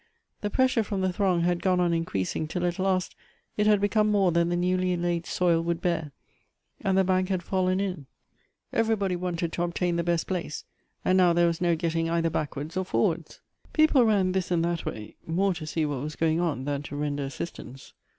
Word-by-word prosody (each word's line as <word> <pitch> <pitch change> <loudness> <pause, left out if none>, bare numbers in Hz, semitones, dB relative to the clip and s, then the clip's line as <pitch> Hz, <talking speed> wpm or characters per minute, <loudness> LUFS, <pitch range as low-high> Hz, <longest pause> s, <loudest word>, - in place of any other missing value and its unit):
The 205 - -1
pressure 255 +1 +2
from 200 -2 -3
the 185 -1 0
throng 185 -2 +1
had 175 0 +1
gone 185 -1 +2
on 175 -1 +2
increasing 155 - -2
till 180 +3 -2
at 175 +1 -2
last 185 -1 0 0.4
it 210 0 +1
had 210 -1 +5
become 210 +1 +2
more 195 -3 +3
than 170 0 +2
the 175 - 0
newly 180 0 +1
laid 170 -1 -1
soil 170 -2 +2
would 170 0 -1
bear, 170 -4 -1 0.7
and 190 -1 +2
the 190 - +5
bank 185 0 +1
had 185 -2 -1
fallen 185 0 0
in. 180 -8 -3 0.7
Everybody 215 -5 +1
wanted 175 -2 -2
to - - -2
obtain 175 0 0
the 170 - 0
best 170 -1 0
place, 175 -5 -4 0.4
and 185 0 +4
now 175 -2 +5
there 175 0 +4
was 170 0 0
no 175 -1 +3
getting 165 0 -1
either 165 0 +1
backwards 150 0 -4
or 185 - 0
forwards. 185 - -1 0.3
People 310 -5 +5
ran 200 -5 +3
this 185 -1 -1
and 170 -2 +1
that 170 -1 -2
way, 105 -1 -6
more 190 +4 +1
to 160 -3 -7
see 155 0 0
what 145 -4 -3
was 150 +2 -5
going 160 0 +1
on 155 -7 -1
tlian 145 0 -2
to 145 - -7
render 145 -1 -2
assistance. 135 -2 -8
175 Hz, 210 wpm, -27 LUFS, 165-185 Hz, 0.7 s, had